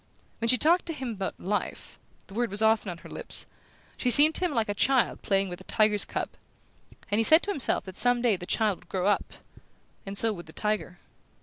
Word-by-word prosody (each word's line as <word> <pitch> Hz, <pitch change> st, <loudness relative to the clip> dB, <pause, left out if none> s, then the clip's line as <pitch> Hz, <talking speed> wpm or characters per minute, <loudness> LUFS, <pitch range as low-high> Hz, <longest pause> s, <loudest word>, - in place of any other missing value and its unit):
When 230 Hz, -, -1 dB
she 250 Hz, -, +6 dB
talked 340 Hz, +7 st, +3 dB
to 330 Hz, -, -2 dB
him 260 Hz, -5 st, -5 dB
about 195 Hz, -3 st, -5 dB
"life" 205 Hz, +2 st, -4 dB, 0.3 s
the 195 Hz, -, -15 dB
word 240 Hz, +2 st, -1 dB
was 205 Hz, +3 st, 0 dB
often 220 Hz, -2 st, +2 dB
on 175 Hz, -, -6 dB
her -, -, -13 dB
lips -, -, -3 dB, 0.5 s
she 250 Hz, -, 0 dB
seemed 295 Hz, +5 st, +6 dB
to 365 Hz, -, -1 dB
him 350 Hz, -, -1 dB
like 230 Hz, -5 st, 0 dB
a 205 Hz, -, -1 dB
child 260 Hz, +4 st, +1 dB
playing 195 Hz, -1 st, +1 dB
with 175 Hz, -1 st, -8 dB
a -, -, -11 dB
tiger's 210 Hz, -2 st, +2 dB
cub; -, -, -3 dB, 0.8 s
and 205 Hz, -, +2 dB
he -, -, +3 dB
said 315 Hz, +8 st, +5 dB
to 410 Hz, -, -2 dB
himself 285 Hz, -10 st, +1 dB
that 190 Hz, -1 st, -10 dB
some 245 Hz, 0 st, +4 dB
day 235 Hz, -4 st, +2 dB
the 180 Hz, -1 st, -8 dB
child 215 Hz, -4 st, 0 dB
would 175 Hz, -, -23 dB
grow 185 Hz, -1 st, -2 dB
up 205 Hz, 0 st, 0 dB, 0.7 s
and 195 Hz, 0 st, -6 dB
so 225 Hz, 0 st, +1 dB
would 175 Hz, -4 st, -10 dB
the 160 Hz, -, -12 dB
tiger. 210 Hz, -4 st, -2 dB
215 Hz, 230 wpm, -27 LUFS, 195-245 Hz, 0.8 s, she